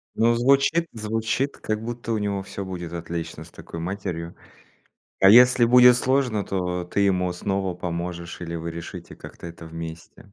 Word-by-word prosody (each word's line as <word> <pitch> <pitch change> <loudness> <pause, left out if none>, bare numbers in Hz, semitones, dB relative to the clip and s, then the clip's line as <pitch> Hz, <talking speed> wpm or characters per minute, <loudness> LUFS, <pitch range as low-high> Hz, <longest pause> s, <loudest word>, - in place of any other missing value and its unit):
Ну, 115 +1 +3
звучит 140 +7 +3
звучит, 115 +5 -2
как 110 0 -3
будто 120 0 -5
у 110 - 0
него 100 -1 -2
всё 100 +1 -6
будет 90 -3 -6
отлично 85 -1 -5
с - - -15
такой 85 - -9
матерью. 85 -2 -4 0.9
А 95 0 +8
если 125 +1 +7
будет 125 +1 +7
сложно, 125 -5 +1
то 90 -2 -2
ты 90 +3 -2
ему 90 -2 +2
снова 95 0 -2
поможешь, 85 0 -5
или 85 -1 -5
вы 85 0 -5
решите 85 0 -8
как-то - - -11
это 85 0 -10
вместе. 80 +4 -9
95 Hz, 165 wpm, -24 LUFS, 85-115 Hz, 0.9 s, А